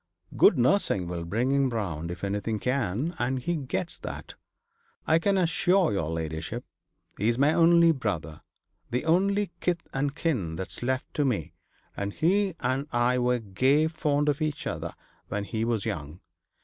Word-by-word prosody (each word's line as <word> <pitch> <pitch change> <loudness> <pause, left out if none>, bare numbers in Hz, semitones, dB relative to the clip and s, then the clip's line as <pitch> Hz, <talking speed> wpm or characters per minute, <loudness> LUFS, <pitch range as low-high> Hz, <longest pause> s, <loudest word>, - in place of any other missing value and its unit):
Good - - +6
nursing 120 - +2
will 85 -1 -4
bring 115 +9 0
him 140 -1 +3
round 90 -9 -3
if 90 +2 -7
anything 105 +2 -1
can; 125 - -1
and 130 +2 0
he 170 +7 -1
gets 150 +4 -3
that, - - -7 0.7
I 160 - +4
can 195 +3 +2
assure 180 - +3
your 80 -6 -1
ladyship. 80 -1 -4 0.5
He's 115 +4 +2
my 145 +4 +4
only 170 0 +6
brother, 85 - -3 0.5
the 125 +5 -1
only 195 +4 +2
kith 175 -2 -1
and 140 +2 -1
kin 120 - -1
that's 95 +3 -6
left 130 +2 -2
to 150 - +1
me, 90 - -1 0.4
and 100 0 -3
he 190 +2 +2
and 135 +3 0
I 120 +1 +2
were 125 0 +2
gay 130 +8 +2
fond 150 -2 0
of 150 +1 +1
each 155 -1 -2
other - - -4 0.3
when 105 -1 -2
he 110 +2 -2
was 115 -3 0
young. 75 +2 -4
125 Hz, 160 wpm, -27 LUFS, 100-160 Hz, 0.7 s, Good